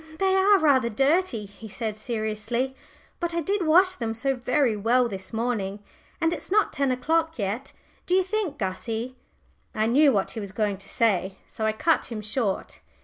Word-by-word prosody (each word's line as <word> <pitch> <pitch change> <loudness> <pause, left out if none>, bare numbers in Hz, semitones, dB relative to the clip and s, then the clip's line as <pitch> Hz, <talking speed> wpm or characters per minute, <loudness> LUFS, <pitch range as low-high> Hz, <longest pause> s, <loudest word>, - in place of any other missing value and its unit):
"They 380 +2 +2
are 395 +1 +5
rather 275 -8 +3
dirty," 270 - +1
he 210 +2 -12
said 220 0 -4
seriously. 220 +3 -2 0.4
"But 345 -1 -2
I 340 - +1
did 385 +1 -1
wash 365 +4 +5
them 230 -8 -3
so 270 +4 0
very 250 -1 +1
well 240 +4 +2
this 190 -4 -7
morning, 220 -4 -2 0.4
and 330 0 +2
it's 310 - -7
not 420 +2 +2
ten 275 -1 +1
o'clock 320 +6 0
yet. 220 +6 -3 0.4
Do 360 - +3
you 380 - +4
think, 380 -5 -2
Gussie 225 +5 -3 0.3
?" - - -36
I 215 - +1
knew 275 +5 +5
what 200 -5 0
he 225 - -6
was 200 -2 -7
going 205 -2 0
to 195 - -11
say, 195 -4 +1
so 220 - -3
I 215 - +1
cut 320 +9 +1
him 220 -3 -6
short. 210 -2 -2
245 Hz, 190 wpm, -25 LUFS, 215-320 Hz, 0.4 s, are